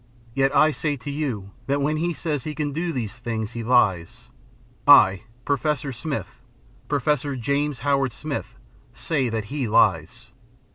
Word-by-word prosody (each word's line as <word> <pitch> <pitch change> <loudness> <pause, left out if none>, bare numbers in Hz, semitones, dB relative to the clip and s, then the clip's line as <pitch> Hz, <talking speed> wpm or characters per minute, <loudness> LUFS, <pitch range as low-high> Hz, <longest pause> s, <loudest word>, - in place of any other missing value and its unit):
Yet 135 +1 +1
I 155 0 +5
say 150 0 -1
to 140 +2 -6
you, 125 -10 -3 0.2
that 140 +1 +1
when 150 +2 0
he 170 +2 0
says 155 -5 -2
he 155 -1 -5
can 145 0 -2
do 170 +3 -2
these 115 -8 -3
things, 115 -2 -4
he 115 0 -5
lies. 115 -1 +1 0.6
I, 105 -8 +7 0.2
Professor 140 -1 -1
Smith, 125 - -5 0.5
Professor 145 0 0
James 140 +2 -1
Howard 135 -2 +2
Smith, 145 +3 -5 0.4
say 135 -2 0
that 110 -2 -3
he 140 -5 -1
lies. 95 -7 +1
135 Hz, 150 wpm, -24 LUFS, 115-150 Hz, 0.6 s, I